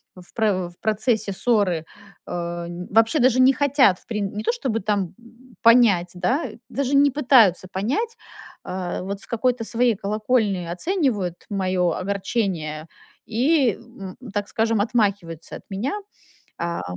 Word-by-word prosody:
в 180 -1 -15
про 195 -5 0
в 175 - -19
процессе 220 -1 0
ссоры. 195 -7 +1 0.4
Э, - - -8 0.4
н 175 +1 -7
вообще 225 +8 +4
даже 255 0 +4
не 265 +1 +6
хотят 270 -9 +3
в - - -28
прин 210 -3 -2
не 210 - -4
то, - - +2
чтобы 260 - -2
там, 200 -3 -1
э, - - -22 0.4
понять, 225 -7 +5
да, 245 - 0 0.2
даже 280 0 -1
не 280 0 +5
пытаются 240 - +4
понять, 285 - -1 0.5
а, 185 -1 -4
вот 200 +1 -4
с - - -9
какой-то 240 0 0
своей 235 0 +2
колокольни 210 -1 0
оценивают 205 - -1
моё 185 -3 0
огорчение 185 -5 -2 0.4
и, 260 +3 +2
м, 195 -4 -11 0.2
так 205 -1 -2
скажем, 225 -1 +1
отмахиваются 200 -7 -1
от - - -15
меня, 200 +8 -2 0.6
а 170 0 -3
210 Hz, 145 wpm, -23 LUFS, 185-245 Hz, 0.6 s, не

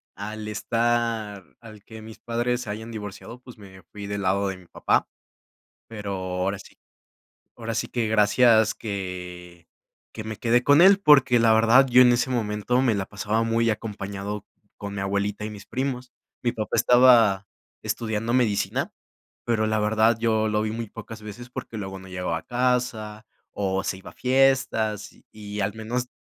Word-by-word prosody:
Al 105 +1 -6
estar 115 -2 -1 0.2
al 110 -3 -13
que 110 0 -11
mis 110 0 -12
padres 120 +1 -1
se 115 - -7
hayan 110 +2 -6
divorciado, 110 +2 -8
pues, 125 -1 -14
me 95 -2 -14
fui 100 -1 -8
del 100 0 -3
lado 100 +1 +1
de 95 - -5
mi 90 - -17
papá, - - 0 0.8
pero 105 -3 -6
ahora 95 +1 -2
sí - - -15 0.8
ahora 115 -1 -5
sí 115 +1 -2
que 115 -2 -1
gracias 110 +1 +4
que 90 -4 -7 0.5
que 110 - -6
me 110 -1 -5
quedé 120 +3 +2
con 145 +5 +5
él, 195 +1 +7
porque 135 -7 +5
la 115 -1 +4
verdad 115 +4 +5
yo 125 +1 +7
en 125 -1 +6
ese 120 +2 0
momento 110 0 0
me 120 -5 +2
la 95 -1 -2
pasaba 105 +3 -1
muy 115 0 +1
acompañado 105 -1 -5 0.3
con 100 0 -7
mi 95 - -4
abuelita 100 +2 -2
y - - -6
mis 105 -1 -10
primos, 130 -1 -4 0.3
mi 120 - 0
papá 110 -3 -3
estaba 115 -4 +5 0.4
estudiando 110 0 -2
medicina, 115 -6 0 0.5
pero, 110 -2 +1
la 110 0 0
verdad, 110 +2 +3
yo 110 -1 +1
lo 105 0 0
vi 110 - -2
muy 115 +1 -4
pocas 115 +1 -10
veces, 110 +4 -9
porque 125 -3 -7
luego 95 -1 -6
no 95 - -13
llegaba 90 -2 -3
a - - -12
casa, 120 -4 -1 0.2
o 95 -1 -2
se - - -2
iba 95 - -11
a - - -18
fiestas, 130 -5 +1
y - - -24
y 105 -1 -7
al 100 +1 -1
menos 120 +3 -3
110 Hz, 175 wpm, -24 LUFS, 100-120 Hz, 0.8 s, él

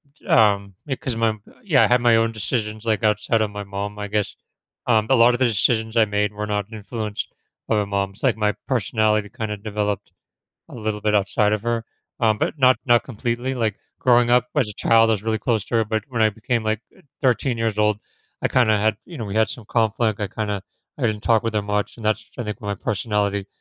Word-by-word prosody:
j - - -25
um, 100 -3 +3
because 130 -2 -3
my 115 0 +2
m 110 -1 -5 0.2
Yeah, 160 -10 +4
I - - +5
had 125 0 +3
my 120 -1 +5
own 115 0 +2
decisions, 110 0 -3
like, 110 0 0
outside 110 +1 +2
of 105 -1 0
my 105 0 -5
mom, 100 +1 -5
I 105 - -3
guess. 105 0 -1 0.5
Um, 110 -2 +3
a 135 - +5
lot 120 0 +6
of 120 - -2
the 130 - +4
decisions 110 0 +1
I 115 -1 +5
made 105 0 -1
were 105 0 -4
not 105 -1 -1
influenced 110 0 -5 0.4
by - - +1
my 105 - +1
mom, 100 -1 -1
it's, 100 - -15
like, - - +3
my 105 -1 +1
personality 110 -4 +1
kinda 110 -3 -4
developed 105 -1 -3 0.6
a - - -12
little 110 -3 -3
bit 105 0 +1
outside 105 +1 +2
of 105 - 0
her, 115 -1 -1 0.4
um, 110 -2 +3
but 155 - -1
not 130 -1 +5
not 120 -1 +4
completely, 120 +2 -3
like, 110 -5 -1 0.2
growing 120 -1 +4
up 125 0 +4
as 130 -7 +2
a - - -5
child, 115 +1 +4
I - - +4
was 105 -2 -1
really 110 0 0
close 110 -2 0
to 120 - -1
her, 115 - +3
but 110 0 -1
when 120 -4 -3
I 110 - +4
became, 110 +2 -2
like, 110 0 0 0.2
eh, 190 - -21 0.2
13 125 -1 +1
years 110 -2 -1
old, 105 0 +2 0.4
I - - +2
kinda 110 -4 +3
had 110 +1 +1
you 170 -4 -10
know, 115 - -3
we 100 0 -5
had 110 0 +3
some 120 - -8
conflict, 110 -1 +1
I 105 - 0
kinda 105 -1 -3 0.4
I - - -7
didn't 105 -1 -2
talk 115 -2 +3
with 115 -1 -2
her 105 - +1
much 105 0 -2
and 115 - -11
that's 110 0 0
I - - -1
think 105 -2 -5
my 100 -1 -3
personality 100 0 -1
110 Hz, 235 wpm, -22 LUFS, 105-115 Hz, 0.6 s, lot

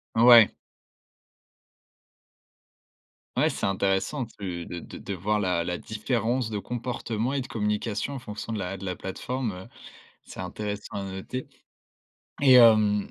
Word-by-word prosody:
Ouais. 115 -1 +8 2.8
Ouais, - - +4
c'est - - -3
intéressant 95 +7 0
tu 90 -6 -6
de 85 - -6
de - - -10
de 100 - -5
voir 105 +4 0
la 90 -4 +1
la 90 0 -3
différence 115 +2 -1
de 105 - -2
comportement 120 +1 -3
et 140 - 0
de 130 - -7
communication 105 +3 -2
en 135 - -5
fonction 110 0 -6
de 105 - -2
la 95 +1 -4
de 95 - -8
la 90 -1 -2
plateforme, 115 +5 -4
heu, 90 +1 -9 0.6
c'est - - -8
intéressant 105 +2 -5
à 100 - -3
noter 95 +7 -6 0.9
et 135 -2 +7
hem, 110 -4 +6
105 Hz, 140 wpm, -26 LUFS, 95-120 Hz, 2.8 s, Ouais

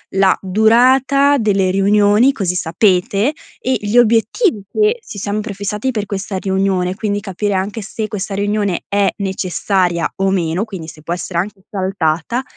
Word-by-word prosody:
la 195 -1 +4
durata 255 +8 +4
delle 195 -5 +1
riunioni, 205 +6 +4
così 180 -6 -2
sapete, 190 - +1 0.3
e 260 0 0
gli 205 +3 -3
obiettivi 230 - +3
che 435 +3 +1
ci 215 - -8
siamo 205 +2 -2
prefissati 210 +3 -3
per 210 -4 -3
questa 200 0 -4
riunione, 190 -1 0
quindi 205 -1 -2
capire 205 +1 -2
anche 200 +4 -2
se 215 +1 -5
questa 205 -2 -4
riunione 205 -2 -1
è 200 -1 +2
necessaria 185 -2 -1
o 195 0 +1
meno, 180 +1 0
quindi 185 -7 -8
se 155 -1 -14
può 170 - -3
essere 175 0 -3
anche 195 +1 -4
saltata 190 +4 -1
200 Hz, 155 wpm, -17 LUFS, 190-220 Hz, 0.3 s, la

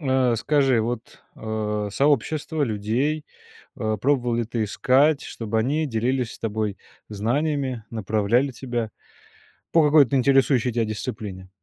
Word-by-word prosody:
а, 130 -4 +2
скажи, 135 -2 +2
вот, 120 +1 -5
а, 105 -1 -2
сообщество 145 +4 +1
людей, 125 +7 -1 0.5
а, 110 0 -1
пробовала 125 0 +1
ли 120 - 0
ты 115 0 -2
искать, 140 +7 +3
чтобы 110 -1 -3
они 145 +7 0
делились 125 0 -1
с - - -13
тобой 105 -2 -2 0.3
знаниями, 130 +3 -1
направляли 110 +4 +1
тебя 120 -3 -3 0.8
по 165 -2 +5
какой-то 145 -3 +5
интересующей 130 -2 +3
тя 115 0 +1
дисциплине? 105 -4 -5
120 Hz, 125 wpm, -24 LUFS, 110-140 Hz, 0.8 s, по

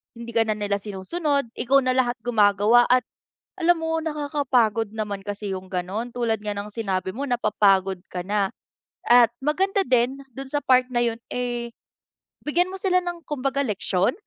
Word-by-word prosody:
hindi 235 0 -8
ka 230 - +5
na 215 -1 0
nila 205 -1 -1
sinusunod 280 - -2
ikaw 260 +3 +4
na 255 0 +1
lahat 250 -1 +1
gumagawa 215 0 +4
at 250 -2 +4 0.5
alam 350 0 +4
mo 325 0 0
nakakapagod 280 -8 0
naman 205 -2 -3
kasi 205 -1 -4
yung 185 0 -6
ganon. 190 +6 -3
Tulad 230 -3 0
nga 210 -1 -2
ng 205 +1 -5
sinabi 190 -4 -2
mo 265 - -5
napapagod 195 -5 +2
ka 180 - -3
na 200 0 +1 0.6
at 240 -1 +7
maganda 385 +7 +1
din 250 +2 +2 0.2
dun 270 +2 -7
sa 295 - 0
part 255 -1 +4
na 240 0 +2
yun 230 -1 -2
eh 240 -1 -2 0.8
bigyan 350 +4 +2
mo 385 - -6
sila 365 -2 +2
ng 350 -1 -4
kumbaga 275 -1 -1
leksyon 200 - 0
240 Hz, 170 wpm, -24 LUFS, 205-275 Hz, 0.8 s, at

